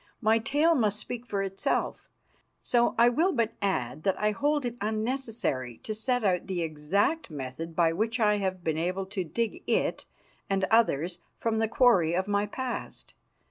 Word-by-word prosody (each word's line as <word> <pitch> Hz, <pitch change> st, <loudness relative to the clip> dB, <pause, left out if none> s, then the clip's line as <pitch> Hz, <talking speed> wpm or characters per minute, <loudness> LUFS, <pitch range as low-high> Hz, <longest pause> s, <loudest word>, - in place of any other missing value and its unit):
My 225 Hz, -1 st, +3 dB
tale 295 Hz, +8 st, +3 dB
must 215 Hz, -8 st, +1 dB
speak 245 Hz, +2 st, -5 dB
for 200 Hz, -2 st, -1 dB
itself. 195 Hz, 0 st, -2 dB, 0.5 s
So 240 Hz, -1 st, +2 dB
I 235 Hz, +1 st, +6 dB
will 320 Hz, +10 st, +3 dB
but 230 Hz, -6 st, 0 dB
add 140 Hz, -9 st, -1 dB
that 195 Hz, +1 st, 0 dB
I 210 Hz, 0 st, +2 dB
hold 290 Hz, +6 st, 0 dB
it 240 Hz, -1 st, -3 dB
unnecessary 215 Hz, -, -2 dB
to 215 Hz, -, -3 dB
set 245 Hz, +3 st, -1 dB
out 185 Hz, -3 st, +1 dB
the 180 Hz, -3 st, -1 dB
exact 170 Hz, -, 0 dB
method 150 Hz, +3 st, -6 dB
by 165 Hz, -1 st, +3 dB
which 225 Hz, +6 st, -1 dB
I 210 Hz, -2 st, +3 dB
have 185 Hz, -3 st, -2 dB
been 160 Hz, -1 st, 0 dB
able 185 Hz, +3 st, -1 dB
to 190 Hz, -1 st, -3 dB
dig 230 Hz, -, -3 dB
it -, -, 0 dB, 0.4 s
and 195 Hz, -1 st, +1 dB
others 180 Hz, -6 st, +2 dB, 0.2 s
from 225 Hz, -1 st, 0 dB
the 225 Hz, -, +2 dB
quarry 200 Hz, -9 st, +4 dB
of 190 Hz, +2 st, 0 dB
my 205 Hz, 0 st, +1 dB
past. 255 Hz, +2 st, -6 dB
210 Hz, 175 wpm, -28 LUFS, 180-235 Hz, 0.5 s, I